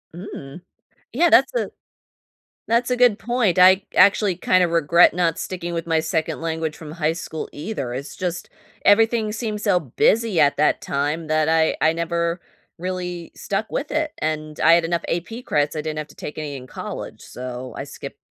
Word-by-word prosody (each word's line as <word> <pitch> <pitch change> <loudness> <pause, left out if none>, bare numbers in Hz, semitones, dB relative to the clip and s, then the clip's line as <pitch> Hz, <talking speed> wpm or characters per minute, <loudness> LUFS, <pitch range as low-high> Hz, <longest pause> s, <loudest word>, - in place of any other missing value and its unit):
Mm. 175 -4 -9 0.5
Yeah, 335 +7 +3
that's 265 - +5
a - - -1 1.0
That's 235 +2 +2
a 250 - +1
good 245 -4 +4
point, 230 -7 +1
I 185 +1 +7
actually 200 -2 +5
kinda 185 -1 +3
regret 170 +1 +4
not 170 -2 +1
sticking 175 -2 -4
with 165 0 -3
my 165 -1 +1
second 160 -1 -2
language 160 -1 -2
from 155 -2 -9
high 160 -1 0
school 160 -2 -6
either, 145 - -5
it's 135 +2 -6
just 175 -2 -4 0.3
everything 220 +1 +4
seems 215 -2 -4
so 195 -4 +3
busy 195 - +1
at 145 -2 +4
that 150 - +2
time 150 +3 -2
that 155 0 +1
I 160 0 +2
I 160 +1 +3
never 170 +1 -1 0.4
really 180 -1 -4
stuck 205 +2 -3
with 285 - -3
it, 310 0 -1
and 155 0 -3
I 165 - +6
had 170 0 +4
enough 170 0 -1
AP 225 +8 -4
credits, 145 -5 0
I 155 - -2
didn't 155 0 -4
have 150 - -5
to - - -18
take 150 - -7
any 145 -2 -5
in 130 - -8
college, - - -7
so 125 0 -7
I - - -4
skipped - - -9
170 Hz, 185 wpm, -22 LUFS, 155-205 Hz, 1.0 s, I